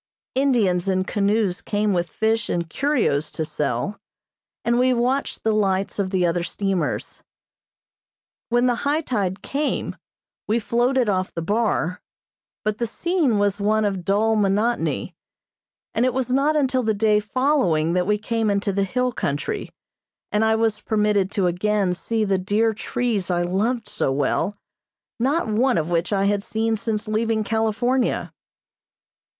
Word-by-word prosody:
Indians 225 Hz, -10 st, +2 dB
in 185 Hz, -1 st, +1 dB
canoes 200 Hz, -1 st, 0 dB
came 210 Hz, -1 st, 0 dB
with 175 Hz, -1 st, 0 dB
fish 220 Hz, 0 st, 0 dB
and 170 Hz, -1 st, -1 dB
curios 220 Hz, -, 0 dB
to 160 Hz, -, -3 dB
sell, 150 Hz, -, -2 dB, 0.7 s
and 235 Hz, +1 st, +2 dB
we 255 Hz, 0 st, +3 dB
watched 255 Hz, +4 st, -1 dB
the 220 Hz, -, +2 dB
lights 195 Hz, -1 st, 0 dB
of 195 Hz, -2 st, 0 dB
the 185 Hz, -2 st, +1 dB
other 170 Hz, 0 st, +1 dB
steamers. 195 Hz, +1 st, -2 dB, 1.3 s
When 240 Hz, +1 st, +3 dB
the 245 Hz, -1 st, +2 dB
high 290 Hz, +3 st, +1 dB
tide 200 Hz, -, -2 dB
came, 290 Hz, +2 st, -2 dB, 0.5 s
we 220 Hz, -, +2 dB
floated 240 Hz, +3 st, +1 dB
off 185 Hz, -2 st, 0 dB
the 165 Hz, -, -4 dB
bar, 205 Hz, -3 st, 0 dB, 0.6 s
but 215 Hz, 0 st, -1 dB
the 235 Hz, -, 0 dB
scene 310 Hz, -, 0 dB
was 205 Hz, 0 st, +1 dB
one 215 Hz, +1 st, +2 dB
of 195 Hz, -3 st, -2 dB
dull 215 Hz, +4 st, +2 dB
monotony, 210 Hz, +3 st, 0 dB, 0.8 s
and 230 Hz, -, +1 dB
it 255 Hz, -1 st, +1 dB
was 255 Hz, -1 st, 0 dB
not 285 Hz, +3 st, +2 dB
until 265 Hz, -3 st, +2 dB
the 220 Hz, -3 st, 0 dB
day 210 Hz, 0 st, +3 dB
following 205 Hz, -, +1 dB
that 180 Hz, 0 st, +1 dB
we 210 Hz, 0 st, +2 dB
came 225 Hz, 0 st, -1 dB
into 200 Hz, 0 st, 0 dB
the 200 Hz, +1 st, +1 dB
hill 250 Hz, +5 st, 0 dB
country, 150 Hz, -, -3 dB, 0.6 s
and 210 Hz, +1 st, +2 dB
I 220 Hz, 0 st, +3 dB
was 220 Hz, -1 st, 0 dB
permitted 210 Hz, -3 st, +1 dB
to 195 Hz, -, +1 dB
again 190 Hz, +1 st, +1 dB
see 220 Hz, +4 st, -1 dB
the 195 Hz, -2 st, +1 dB
dear 215 Hz, +4 st, +1 dB
trees 220 Hz, -3 st, -2 dB
I 175 Hz, -1 st, +1 dB
loved 215 Hz, +6 st, -1 dB
so -, -, -1 dB
well, 145 Hz, +9 st, 0 dB, 0.6 s
not 280 Hz, +8 st, +1 dB
one 240 Hz, +4 st, +2 dB
of 160 Hz, +2 st, -1 dB
which 170 Hz, +2 st, 0 dB
I 195 Hz, -1 st, +2 dB
had 200 Hz, 0 st, +1 dB
seen 225 Hz, 0 st, 0 dB
since 215 Hz, 0 st, -3 dB
leaving 220 Hz, 0 st, 0 dB
California. 225 Hz, +4 st, 0 dB
215 Hz, 155 wpm, -23 LUFS, 190-235 Hz, 1.3 s, we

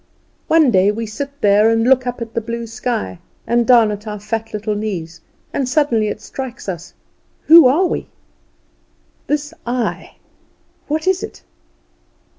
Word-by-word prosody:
One 315 Hz, -5 st, +4 dB
day 190 Hz, -1 st, +4 dB
we 225 Hz, +2 st, -4 dB
sit 225 Hz, +6 st, -5 dB
there 205 Hz, +2 st, +5 dB
and 225 Hz, 0 st, +2 dB
look 255 Hz, +1 st, +3 dB
up 245 Hz, -1 st, -3 dB
at 230 Hz, 0 st, -12 dB
the 230 Hz, -, -1 dB
blue 235 Hz, +1 st, -5 dB
sky, 225 Hz, -, -4 dB, 0.3 s
and 235 Hz, -1 st, +1 dB
down 235 Hz, -4 st, +5 dB
at 210 Hz, +1 st, -7 dB
our 210 Hz, -1 st, -5 dB
fat 225 Hz, +2 st, -4 dB
little 210 Hz, 0 st, -2 dB
knees; 180 Hz, -6 st, -5 dB, 0.3 s
and 265 Hz, -3 st, -1 dB
suddenly 250 Hz, -7 st, +2 dB
it -, -, -4 dB
strikes 265 Hz, -4 st, -7 dB
us, 175 Hz, -2 st, -6 dB, 0.5 s
Who 325 Hz, -3 st, +8 dB
are 310 Hz, +9 st, +3 dB
we? -, -, -2 dB, 1.2 s
This 295 Hz, +1 st, -2 dB
I, 245 Hz, 0 st, -3 dB, 0.7 s
what 310 Hz, +1 st, -2 dB
is 375 Hz, 0 st, +2 dB
it? 435 Hz, -, -8 dB
230 Hz, 155 wpm, -18 LUFS, 210-265 Hz, 1.2 s, Who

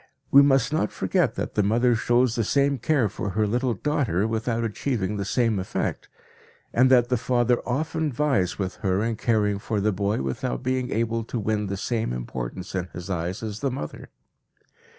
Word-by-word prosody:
We 140 Hz, -, +9 dB
must 135 Hz, -1 st, +3 dB
not 155 Hz, -, +1 dB
forget 170 Hz, -, 0 dB
that -, -, -3 dB
the 105 Hz, -, +2 dB
mother 120 Hz, +5 st, +3 dB
shows 120 Hz, +1 st, +2 dB
the 115 Hz, -, 0 dB
same 140 Hz, +3 st, +2 dB
care 135 Hz, -2 st, +2 dB
for 100 Hz, 0 st, -4 dB
her 105 Hz, +3 st, +1 dB
little 120 Hz, +3 st, 0 dB
daughter 110 Hz, -, 0 dB
without 115 Hz, +1 st, -1 dB
achieving 105 Hz, -2 st, -2 dB
the 100 Hz, -, -2 dB
same 115 Hz, -2 st, +1 dB
effect, 95 Hz, -, -3 dB, 0.6 s
and 130 Hz, +2 st, +5 dB
that 125 Hz, -2 st, +5 dB
the 125 Hz, -, +2 dB
father 120 Hz, 0 st, +1 dB
often 155 Hz, +4 st, -1 dB
vies 130 Hz, -9 st, +1 dB
with 95 Hz, -2 st, -3 dB
her 95 Hz, +1 st, 0 dB
in 115 Hz, 0 st, -1 dB
caring 105 Hz, -3 st, +1 dB
for 105 Hz, +1 st, -2 dB
the 105 Hz, +2 st, +2 dB
boy 100 Hz, -5 st, -1 dB
without 65 Hz, -2 st, -3 dB
being 130 Hz, -1 st, -1 dB
able 115 Hz, +1 st, -1 dB
to 120 Hz, -, -4 dB
win 105 Hz, -1 st, -1 dB
the 100 Hz, 0 st, -3 dB
same 110 Hz, -, -1 dB
importance 60 Hz, +8 st, -5 dB
in 90 Hz, -2 st, -2 dB
his 90 Hz, +3 st, -6 dB
eyes 90 Hz, +3 st, -3 dB
as 105 Hz, -1 st, -4 dB
the 140 Hz, -, 0 dB
mother. 125 Hz, -, -6 dB
115 Hz, 190 wpm, -25 LUFS, 100-125 Hz, 0.6 s, We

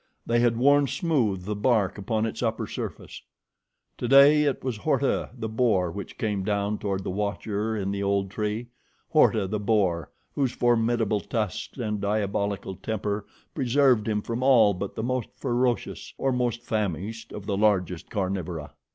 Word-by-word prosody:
They 120 Hz, 0 st, +2 dB
had 120 Hz, -1 st, +3 dB
worn 140 Hz, +3 st, +4 dB
smooth 125 Hz, -, 0 dB
the 105 Hz, +1 st, -2 dB
bark 105 Hz, -2 st, +1 dB
upon 110 Hz, +2 st, -1 dB
its 115 Hz, -, -4 dB
upper 115 Hz, -2 st, -1 dB
surface. -, -, -7 dB, 0.8 s
Today 140 Hz, +4 st, +6 dB
it 140 Hz, -, -1 dB
was 130 Hz, -4 st, -2 dB
Horta, 140 Hz, +2 st, 0 dB
the 110 Hz, -2 st, -3 dB
boar, 110 Hz, -6 st, +1 dB
which 100 Hz, +3 st, -7 dB
came 105 Hz, -3 st, -1 dB
down 105 Hz, +1 st, -1 dB
toward 95 Hz, -2 st, -2 dB
the -, -, -3 dB
watcher 105 Hz, +2 st, -2 dB
in 100 Hz, -1 st, -2 dB
the 100 Hz, 0 st, -3 dB
old 100 Hz, -1 st, 0 dB
tree 105 Hz, +3 st, -3 dB, 0.4 s
Horta, -, -, +4 dB
the 105 Hz, +3 st, -2 dB
boar, 95 Hz, -7 st, +1 dB, 0.2 s
whose 135 Hz, -4 st, 0 dB
formidable 115 Hz, -3 st, +2 dB
tusks 110 Hz, +2 st, -3 dB
and 105 Hz, -4 st, -2 dB
diabolical 100 Hz, -1 st, -1 dB
temper 105 Hz, +1 st, -3 dB, 0.3 s
preserved 130 Hz, -4 st, +3 dB
him 105 Hz, -1 st, 0 dB
from 115 Hz, +1 st, -3 dB
all 120 Hz, -6 st, +5 dB
but 95 Hz, +2 st, -5 dB
the 110 Hz, -, -3 dB
most 125 Hz, -1 st, -1 dB
ferocious 120 Hz, 0 st, -1 dB
or 135 Hz, -, +1 dB
most 120 Hz, -2 st, -1 dB
famished 105 Hz, +1 st, -3 dB
of 105 Hz, -, -7 dB
the 100 Hz, -, -1 dB
largest 95 Hz, -4 st, +1 dB
carnivora. 90 Hz, -6 st, -3 dB
110 Hz, 160 wpm, -26 LUFS, 100-120 Hz, 0.8 s, Today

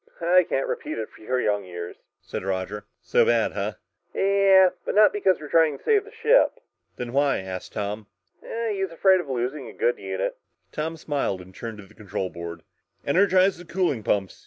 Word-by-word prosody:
"I 180 Hz, +2 st, +5 dB
can't 135 Hz, -, 0 dB
repeat -, -, -4 dB
it 110 Hz, -1 st, -4 dB
for -, -, -16 dB
your 125 Hz, +4 st, -1 dB
young 105 Hz, -3 st, 0 dB
ears," 85 Hz, -1 st, -7 dB, 0.3 s
said -, -, -5 dB
Roger. 95 Hz, +2 st, -3 dB, 0.2 s
"So 485 Hz, -, +3 dB
bad, 475 Hz, -, +2 dB
huh?" -, -, -3 dB, 0.4 s
"Yeah, 195 Hz, -1 st, +5 dB
but -, -, -3 dB
not 210 Hz, 0 st, +6 dB
because 195 Hz, -3 st, +2 dB
we're 150 Hz, -, -8 dB
trying 160 Hz, -2 st, +3 dB
to -, -, -24 dB
save 420 Hz, -2 st, +3 dB
the 435 Hz, -, -13 dB
ship." 475 Hz, +2 st, +3 dB, 0.4 s
"Then 120 Hz, -1 st, -6 dB
why?" 140 Hz, 0 st, +3 dB
asked 95 Hz, -1 st, -7 dB
Tom. 105 Hz, 0 st, -4 dB, 0.6 s
"He's 195 Hz, -2 st, -2 dB
afraid 185 Hz, +3 st, +4 dB
of 150 Hz, -, -11 dB
losing 130 Hz, +3 st, -3 dB
a -, -, -10 dB
good 475 Hz, +1 st, 0 dB
unit!" -, -, -3 dB, 0.3 s
Tom 160 Hz, +2 st, -3 dB
smiled 145 Hz, -11 st, -2 dB
and 90 Hz, +1 st, -13 dB
turned 115 Hz, +2 st, -7 dB
to 105 Hz, -, -11 dB
the -, -, -20 dB
control 95 Hz, -3 st, -4 dB
board. 85 Hz, 0 st, -7 dB, 0.4 s
"Energize 185 Hz, +3 st, +3 dB
the -, -, -9 dB
cooling 170 Hz, -8 st, -1 dB
pumps!" 100 Hz, -3 st, -1 dB
145 Hz, 190 wpm, -25 LUFS, -, 0.6 s, not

